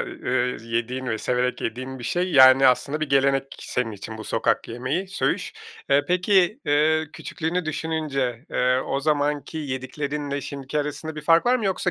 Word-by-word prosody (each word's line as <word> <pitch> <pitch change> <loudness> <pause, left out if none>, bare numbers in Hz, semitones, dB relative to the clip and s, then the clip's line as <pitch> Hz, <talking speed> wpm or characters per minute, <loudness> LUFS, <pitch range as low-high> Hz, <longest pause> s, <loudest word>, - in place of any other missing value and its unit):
ııı, 125 0 -2
yediğin 120 +3 -3
ve 110 -2 -1
severek 125 +2 -1
yediğin 130 +3 -4
bir 120 - -8
şey. 180 +7 -1
Yani, 130 0 +8
aslında 140 +4 +2
bir 155 - -1
gelenek 135 0 +3 0.2
senin 125 -3 -2
için 110 +2 -8
bu 110 - -7
sokak - - 0
yemeği, 130 +11 -3
söğüş. 195 - -1 0.4
E, 140 +1 +4
peki, 180 +5 +2
ııı, 155 +2 +3
küçüklüğünü 175 +2 -3
düşününce, 150 -6 -2
eee, 125 +1 +2
o 135 - -1
zamanki 145 +1 0
yediklerinle 140 +1 -4
şimdiki 140 +2 -5
arasında 150 +2 -4
bir 150 - -6
fark 165 +6 +4
var 250 +1 +4
mı, 230 - -4
yoksa 190 -1 0
140 Hz, 165 wpm, -24 LUFS, 130-160 Hz, 0.4 s, Yani